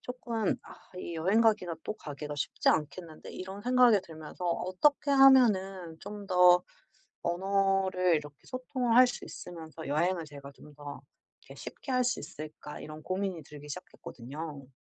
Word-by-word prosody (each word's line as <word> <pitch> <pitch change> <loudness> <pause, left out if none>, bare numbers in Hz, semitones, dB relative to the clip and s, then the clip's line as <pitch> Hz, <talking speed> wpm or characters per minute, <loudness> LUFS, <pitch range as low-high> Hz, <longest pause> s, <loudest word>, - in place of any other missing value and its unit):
조금 235 -4 -2
'아 - - -12 0.2
이 170 - -5
여행 190 +8 +2
가기가 210 -7 +2
또 - - -2
가기가 150 -5 -7
쉽지 145 - 0
않겠는데?' 155 +2 -3
이런 190 +2 -7
생각이 250 -3 +5
들면서 160 0 -9
'어떻게 185 - +1
하면은 200 -11 +5
좀 205 0 -8
더 180 -1 +6 0.6
언어를 190 0 +2
이렇게 145 -1 -6
소통을 255 -2 -1
할 255 0 +9
수 245 - -5
있으면서 160 -3 -9
여행을 170 +4 +1
제가 140 -1 -11
좀 150 - -15
더 145 0 -8 0.5
이렇게 - - -10
쉽게 275 - -8
할 255 -1 +2
수 245 - 0
있을까?' 150 0 -8
이런 155 +1 -9
고민이 185 -3 -2
들기 150 0 -12
시작했거든요. 140 +1 -8
180 Hz, 325 characters per minute, -30 LUFS, 155-215 Hz, 0.6 s, 할